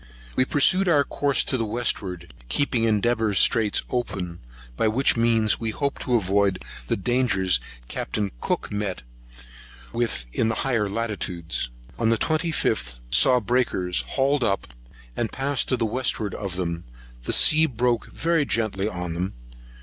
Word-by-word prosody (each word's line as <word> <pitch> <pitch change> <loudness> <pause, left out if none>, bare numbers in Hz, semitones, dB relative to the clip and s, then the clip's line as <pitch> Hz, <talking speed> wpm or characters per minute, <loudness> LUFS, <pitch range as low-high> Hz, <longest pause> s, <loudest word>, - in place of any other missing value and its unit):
We 130 - +3
pursued 185 +8 +3
our 145 -4 +4
course 140 0 +1
to 130 - 0
the 115 - 0
westward, 100 -6 -3 0.2
keeping 120 - +1
Endeavour 110 -1 +1
Straits 105 +2 +3
open, 95 -8 -3 0.4
by 110 - +1
which 125 +6 +3
means 115 -2 +2
we 115 - -2
hoped 140 +5 -2
to 125 - 0
avoid 100 -2 +1 0.2
the - - 0
dangers 100 - +2 0.3
Capt. - - -4 0.2
Cook - - -2
met 105 -8 -3 0.9
with 115 - 0
in 110 - +1
higher 115 -2 0
latitudes. 95 - -3 0.3
On 115 -1 +2
the 115 - +3
25th, 130 - 0
saw 125 - +6
breakers; 105 -6 0
hauled 140 0 +1
up, 100 - -1 0.4
and 115 - -2
passed 135 -1 -1
to 130 - +2
the 115 - 0
westward 110 -2 0
of 100 -3 -4
them; 85 -2 -3 0.4
the - - -1
sea 155 +1 +6
broke 120 -2 0
very 165 -2 +1
gently 110 -6 0
on 90 -4 -4
them. 90 +3 -3
115 Hz, 145 wpm, -24 LUFS, 95-130 Hz, 0.9 s, saw